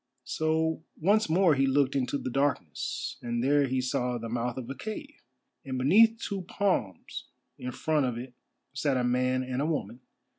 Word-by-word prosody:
So 160 0 0 0.2
once 205 +4 +3
more 175 0 +5
he 135 -1 +2
looked 140 0 +2
into 130 0 0
the 130 - -4
darkness, 135 - -1
and 120 0 -2
there 140 +1 +4
he 130 0 0
saw 125 -1 -1
the 115 -1 -6
mouth 120 +1 -2
of 125 -3 -5
a 135 - -4
cave, 220 - -7 0.4
and 130 -1 -4
beneath 220 - +5
two 200 -4 -3
palms 180 - -2 0.3
in 125 - -4
front 150 +1 +1
of 120 -2 -3
it 125 +1 -7 0.4
sat 135 -1 +1
a 125 - +1
man 125 +1 +1
and 130 +1 -2
a 150 - +1
woman. 125 -7 -2
135 Hz, 180 wpm, -29 LUFS, 125-160 Hz, 0.4 s, more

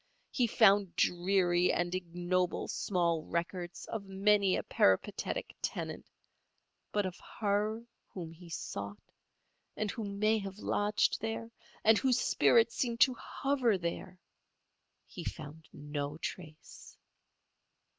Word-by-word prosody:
He 245 -3 +2
found 200 -3 +4
dreary 180 0 +3
and 175 0 -1
ignoble 180 0 -1
small 170 -4 0
records 175 +1 -4
of 205 -3 -5
many 195 0 +3
a - - -2
peripatetic 95 -1 +1
tenant; - - -4 0.8
but 205 -1 +1
of 185 -1 -5 0.2
her 215 +2 0 0.2
whom 170 -4 -7
he 170 +1 -13
sought, 100 -9 -5 0.8
and 215 -1 -1
who 230 - -5
may 210 +2 +1
have 195 -1 -7
lodged 210 0 +1
there, 225 +1 -4 0.3
and 220 -1 +6
whose 260 -1 +2
spirit 230 -2 +4
seemed 235 -2 -2
to 260 - +7
hover 250 -3 0
there, 180 +1 -5 0.9
he 175 - -9
found 155 0 -7
no 145 0 -5
trace. 155 -2 -8
190 Hz, 115 wpm, -32 LUFS, 170-215 Hz, 0.9 s, to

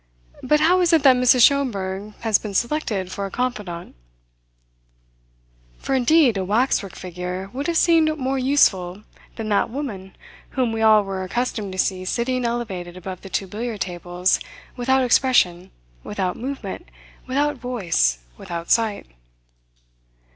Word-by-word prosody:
But 300 +3 +2
how 360 +4 +4
is 345 -1 +3
it 320 -4 +4
that 265 -3 +7
Mrs. 250 -1 +5
Schomberg 210 -7 +1
has 220 -3 +2
been 205 -2 -7
selected 220 -7 -1
for 200 +1 -3
a - - -9
confidante?" 205 -8 -4 1.8
For - - -3
indeed 260 -2 +4
a 190 - -1
waxwork 205 -1 0
figure 180 +1 -6
would 280 +5 -3
have 340 -1 +1
seemed 320 -2 +3
more 265 -1 -1
useful 210 -8 +2 0.3
than 220 -2 -5
that 205 +1 +2
woman 225 -8 -6 0.4
whom 250 -3 +1
we 225 0 -3
all 215 -1 +6
were 195 -1 -4
accustomed 215 0 -3
to - - -7
see 185 0 0
sitting 245 +5 -1
elevated 195 -7 -4
above 185 0 -7
the 195 - -10
two 195 - -1
billiard 215 +2 -5
tables 180 0 0 0.4
without 265 +1 +2
expression, 210 -9 +2 0.3
without 190 -3 -2
movement, 270 +3 -6 0.4
without 285 +2 0
voice, 175 - 0 0.2
without 170 -1 -6
sight. 225 -3 +1
220 Hz, 140 wpm, -22 LUFS, 190-260 Hz, 1.8 s, that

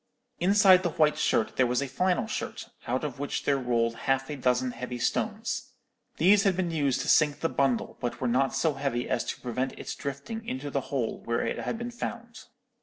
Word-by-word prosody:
Inside 190 0 +6
the 175 - 0
white 150 -1 +3
shirt 110 - +1
there 130 - +4
was 125 +1 +1
a 140 - -1
flannel 180 +2 +1
shirt, - - -5 0.2
out 125 +4 -1
of 140 -4 -4
which 145 - -2
there 140 -1 +2
rolled 115 -2 +1 0.2
half 135 +2 +1
a - - -3
dozen 125 -1 +1
heavy 125 +1 -5
stones. 220 - -2 0.4
These 195 +5 +5
had 195 -2 +2
been 180 -2 0
used 145 -5 +1
to - - -5
sink 150 -2 +4
the 165 - +1
bundle, 135 -4 0
but 120 - -3
were 130 - -1
not 130 +2 +1
so 145 +3 +2
heavy 135 -3 -2
as 120 - 0
to - - -5
prevent 130 +2 -3
its - - -5
drifting 140 +11 -5
into 140 -6 -5
the 140 - 0
hole 130 -5 -2
where 115 0 0
it - - -2
had - - -3
been 240 +1 -5
found. 235 0 -6
140 Hz, 210 wpm, -28 LUFS, 125-180 Hz, 0.4 s, Inside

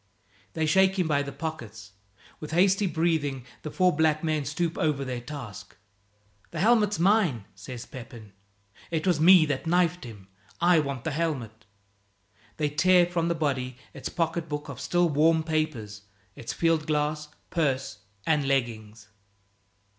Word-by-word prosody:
They 160 - 0
shake 190 +4 +3
him 180 -3 +1
by 145 -2 +2
the 140 0 -5
pockets; 115 -9 -7 0.5
with 155 - -7
hasty 195 +3 +3
breathing 160 -6 -1 0.2
the 155 - -5
four 180 +1 +2
black 155 0 +2
men 155 -3 0
stoop 165 +3 -2
over 145 -3 0
their 125 -2 -4
task. 120 -8 -9 0.7
"The 165 - -6
helmet's 210 0 +3
mine," 175 - +2
says 115 +5 -9
Pepin. 115 -5 -11 0.6
"It 160 -2 -2
was 175 -5 +2
me 175 0 +7
that 145 +1 -3
knifed 175 0 +2
him, 105 -6 -11 0.3
I 175 -1 +5
want 140 -4 -3
the 160 - -2
helmet." 125 -9 -3 0.9
They 150 -1 0
tear 180 +4 +4
from 170 -1 -1
the 170 - 0
body 130 -5 -2 0.2
its 135 -2 -6
pocket 165 0 -2
book 150 0 -4
of - - -7
still 175 0 +2
warm 160 +1 +3
papers, 155 -11 -2 0.3
its 115 - -6
field 165 -2 +1
glass, 150 0 -1 0.2
purse, 135 -8 -1 0.3
and 150 -3 +1
leggings. 110 -5 -2
155 Hz, 150 wpm, -27 LUFS, 130-170 Hz, 0.9 s, me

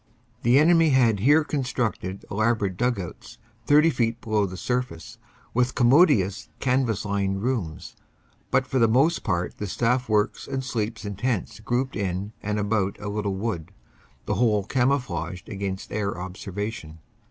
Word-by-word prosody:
The 120 +3 +4
enemy 165 +1 +5
had 120 -6 +3
here 145 +9 +5
constructed 125 -9 -2
elaborate 110 -2 +1
dug 120 +1 0
outs, 90 - -8 0.3
30 150 +3 +6
feet 115 -3 0
below 110 -3 0
the 95 0 -8
surface, 125 -7 -3 0.3
with 125 +1 +1
commodious 120 - +4
canvas 125 -6 0
lined 100 -1 -1
rooms. 90 -10 -3 0.5
But 130 - +2
for 130 +1 -1
the 115 - +5
most 135 +9 +3
part 90 -3 -1
the 105 - -4
staff 125 +5 0
works 105 -1 +1
and 135 0 -3
sleeps 110 -3 -3
in 100 -2 -5
tents 120 -3 -2
grouped 125 +5 -1
in 100 +1 -3
and 105 +1 -2
about 100 -1 0
a 105 0 -5
little 100 -1 -2
wood, 95 -5 -3 0.5
the - - -1
whole 110 -4 +2
camouflaged 100 - -1
against 95 -2 -5
air 100 -2 -2
observation. 95 -2 -6
110 Hz, 150 wpm, -25 LUFS, 100-125 Hz, 0.5 s, 30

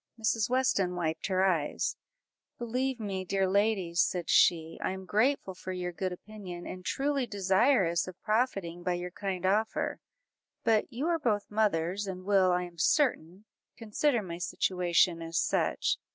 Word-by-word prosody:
Mrs. 220 0 +1
Weston 220 -8 +1
wiped 160 -2 -2
her 190 0 +2
eyes 165 -6 0 0.6
"Believe 250 +2 -2
me, 195 -3 -3
dear 195 +1 0
ladies," 195 -4 +2
said 175 -3 0
she, 165 -1 +3
"I - - 0
am 190 0 -8
grateful 215 +1 +1
for 185 +1 -7
your 180 -1 -3
good 185 +2 -3
opinion, 180 -2 -9
and 185 0 -7
truly 275 +3 -1
desirous 190 -2 +2
of 185 0 -9
profiting 200 -6 0
by 180 0 0
your 175 0 -5
kind 190 -1 -4
offer; 215 +4 0 0.6
but 225 +2 +2
you 255 +5 -3
are 335 -1 +1
both 210 -8 -1
mothers, 200 -2 0
and 185 -1 -6
will, 195 -2 +4
I 180 0 +1
am 175 -1 -10
certain, 195 - +1 0.3
consider 230 +2 0
my 170 -2 -6
situation 180 -1 +1
as 165 0 -4
such. - - +1
190 Hz, 155 wpm, -30 LUFS, 180-220 Hz, 0.6 s, will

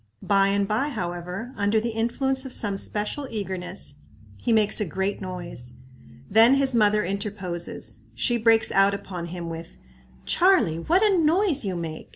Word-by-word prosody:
By 195 -1 +3
and 200 0 +1
by, 225 +8 0
however, 180 +1 -5
under 205 +2 +2
the 230 +2 -2
influence 260 +4 0
of 265 - -4
some 205 -3 -1
special 210 +8 -3
eagerness, 185 -7 -5 0.4
he 235 - -2
makes 215 -1 +3
a - - +1
great 190 +5 -2
noise. 175 -10 -6 0.5
Then 225 +6 +6
his 275 -1 +2
mother 210 -2 +3
interposes. 180 - -5 0.2
She 240 - +1
breaks 225 0 +3
out 195 +1 +4
upon 180 -3 -6
him 170 0 -6
with, 165 0 -8 0.5
"Charlie, 340 - +3
what 350 - +2
a 415 -3 +4
noise 325 -1 +2
you 190 -2 -2
make! 165 -2 -6
200 Hz, 160 wpm, -25 LUFS, 180-235 Hz, 0.5 s, Then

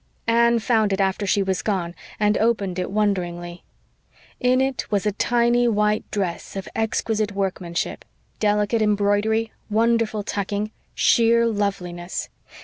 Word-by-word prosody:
Anne 235 +1 +4
found 220 -2 +2
it 195 - 0
after 195 +1 0
she 200 +1 +2
was 190 -1 -1
gone 180 -5 -2 0.3
and 210 0 +3
opened 205 -5 0
it 180 - -2
wonderingly. 175 -4 -2 0.8
In 255 +1 +3
it 265 -1 -1
was 205 -2 0
a 210 - +2
tiny 240 +3 +2
white 210 -1 +1
dress 190 -3 -3
of 195 -1 -5
exquisite 220 -1 -1
workmanship 185 -3 -3 0.4
delicate 210 +1 +1
embroidery, 210 +2 +1 0.2
wonderful 225 -1 +1
tucking, 205 +1 -3 0.2
sheer 235 0 +4
loveliness. 185 -5 -2
210 Hz, 130 wpm, -23 LUFS, 195-225 Hz, 0.8 s, Anne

